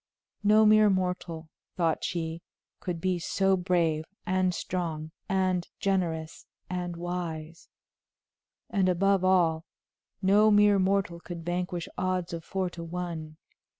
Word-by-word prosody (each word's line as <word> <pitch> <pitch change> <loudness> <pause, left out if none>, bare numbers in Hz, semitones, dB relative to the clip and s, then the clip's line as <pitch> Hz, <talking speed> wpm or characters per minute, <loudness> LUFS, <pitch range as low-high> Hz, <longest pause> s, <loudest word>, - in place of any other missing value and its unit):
No 215 +1 +6
mere 215 0 +6
mortal, 180 -4 -2 0.3
thought 165 -3 +1
she, 165 -1 -3 0.4
could 175 -2 -4
be 185 +1 0
so 195 +3 +2
brave 175 -4 +1 0.2
and 185 0 +2
strong 165 -4 -3 0.2
and 185 -2 +1
generous 170 -5 -1 0.2
and 175 -1 -3
wise; 170 -2 -5 1.0
and 190 -2 +1
above 195 +1 +2
all, 170 -4 +3 0.6
no 205 +2 +5
mere 205 -1 +5
mortal 190 -2 +1
could 170 -1 -8
vanquish 175 0 -2
odds 185 -1 -1
of 165 -1 -5
four 190 +2 -2
to 170 - -7
one. 165 -2 -5
180 Hz, 120 wpm, -28 LUFS, 165-190 Hz, 1.0 s, No